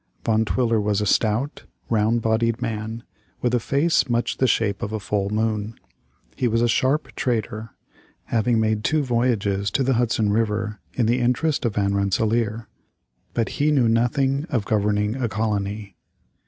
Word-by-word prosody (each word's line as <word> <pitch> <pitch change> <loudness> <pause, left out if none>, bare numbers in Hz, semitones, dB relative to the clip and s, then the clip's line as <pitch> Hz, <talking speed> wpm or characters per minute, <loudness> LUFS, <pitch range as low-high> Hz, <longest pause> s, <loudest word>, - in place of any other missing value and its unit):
Van 110 0 +3
Twiller 115 -1 +1
was 105 -1 0
a 105 - -1
stout, 110 +7 0 0.2
round 115 +1 +1
bodied 115 +1 +1
man, 110 +1 -4 0.4
with 120 -1 +1
a 125 - +3
face 140 +2 +1
much 120 0 0
the 130 - +2
shape 105 -4 +1
of 105 - -3
a 110 - -2
full 100 -1 -1
moon. 110 0 -1 0.6
He 125 - 0
was 115 +1 +1
a - - +4
sharp 130 +6 +1
trader, 115 -3 -2 0.5
having 115 0 +1
made 110 -1 0
two 155 +5 +1
voyages 115 -6 0
to 135 - 0
the 135 +1 +2
Hudson 115 -3 +1
River 105 -1 -1 0.2
in 120 - +1
the 120 +3 +2
interest 125 +5 +1
of 110 -3 -1
Van 100 -1 +1
Rensselaer, 110 +3 0 0.7
but 115 -2 +1
he 145 +1 0
knew 135 -6 +3
nothing 135 +5 +1
of 120 -9 -1
governing 105 0 +1
a 120 -3 -1
colony. 105 -2 -2
115 Hz, 165 wpm, -23 LUFS, 105-120 Hz, 0.7 s, a